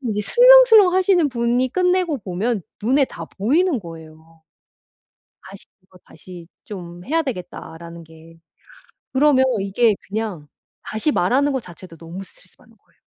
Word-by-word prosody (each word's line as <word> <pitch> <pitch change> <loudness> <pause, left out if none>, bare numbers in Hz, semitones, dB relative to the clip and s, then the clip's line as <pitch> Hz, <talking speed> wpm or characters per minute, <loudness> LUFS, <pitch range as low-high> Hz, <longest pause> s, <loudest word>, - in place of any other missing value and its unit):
이 - - -1
슬렁슬렁하시는 400 - +5
분이 245 +1 -1
끝내고 360 -4 0
보면 200 +4 -3 0.2
눈에 265 +5 +2
다 - - -10
보이는 285 - +1
거예요. 160 -1 -14 1.1
다시 195 +1 -12 0.2
"이거 185 -1 -22
다시 175 -2 -13 0.2
좀 175 -3 -10
해야 325 +3 0
되겠다."라는 170 - -9
게. 160 +1 -18 0.7
그러면 265 -1 +3 0.2
이게 205 +3 +1
그냥 200 -8 -5 0.3
다시 220 +8 -2
말하는 275 +10 +1
거 265 - -2
자체도 175 -2 -14
너무 170 +4 -10
스트레스받는 - - -23
거예요. - - -37
215 Hz, 300 characters per minute, -20 LUFS, 175-290 Hz, 1.1 s, 슬렁슬렁하시는